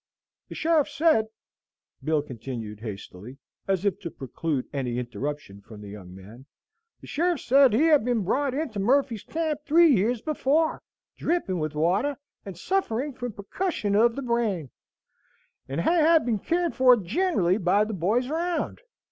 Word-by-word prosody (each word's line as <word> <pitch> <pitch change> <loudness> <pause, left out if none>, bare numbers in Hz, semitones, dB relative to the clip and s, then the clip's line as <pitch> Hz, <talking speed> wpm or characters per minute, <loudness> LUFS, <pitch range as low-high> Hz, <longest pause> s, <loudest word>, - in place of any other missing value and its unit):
"The - - -8
sheriff 320 -3 +2
said," 295 -9 +2 0.8
Bill 155 -2 +1
continued 115 -5 -7
hastily, 105 +2 -9 0.3
as 195 0 0
if 200 -1 0
to 180 -4 -6
preclude 140 0 -4
any 125 -4 -2
interruption 125 -4 -5
from 110 +1 -13
the 105 - -9
young 95 -3 -10
man, 110 +8 -13 0.5
"the - - -12
sheriff 340 0 0
said 270 0 +5
he 230 +8 +3
had 305 -6 +5
been 240 -3 0
brought 265 +7 0
into 280 -9 -3
Murphy's 245 +1 +1
Camp 315 -2 -3
three 325 0 +5
years 220 +4 0
before, 310 +1 +1 0.4
dripping 265 - -1
with 155 -1 -3
water, 195 - +1 0.3
and 190 -4 -7
sufferin' 285 - -1
from 245 -2 -6
perkussion 210 - -3
of 230 +2 +4
the 275 - -4
brain, 220 - -1 1.0
and 140 +5 -2
had 325 - +4
been 225 -4 0
cared 345 - -1
for 255 -2 +6
generally 205 - +1
by 200 +2 +3
the 215 +1 -4
boys 210 +8 0
'round. 335 +3 -2
220 Hz, 155 wpm, -26 LUFS, -, 1.0 s, for